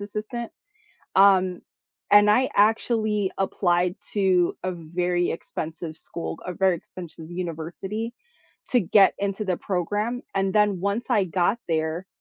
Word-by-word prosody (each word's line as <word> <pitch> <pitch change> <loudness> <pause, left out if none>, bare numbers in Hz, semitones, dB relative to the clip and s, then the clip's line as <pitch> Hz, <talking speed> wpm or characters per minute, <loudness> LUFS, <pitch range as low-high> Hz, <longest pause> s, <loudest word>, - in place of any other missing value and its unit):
assistant, 215 +3 -5 0.7
um, 190 -2 +5 0.5
and 205 0 +7
I 255 +5 +3
actually 215 -1 +2
applied 180 -1 +1 0.2
to 185 -4 +2
a 185 - -2
very 175 +1 -1
expensive 160 0 -6
school, 165 0 -6
a 180 - -3
very 185 0 +2
expensive 165 -1 -11
university, 180 +6 -5 0.6
to 250 - +4
get 195 +1 +5
into 200 +1 -2
the 185 -2 0
program, 205 +8 -2
and 195 -1 0
then 210 -3 +3
once 200 +5 -1
I 200 - +3
got 185 +5 +1
there, 160 +2 -1
190 Hz, 130 wpm, -25 LUFS, 175-210 Hz, 0.7 s, and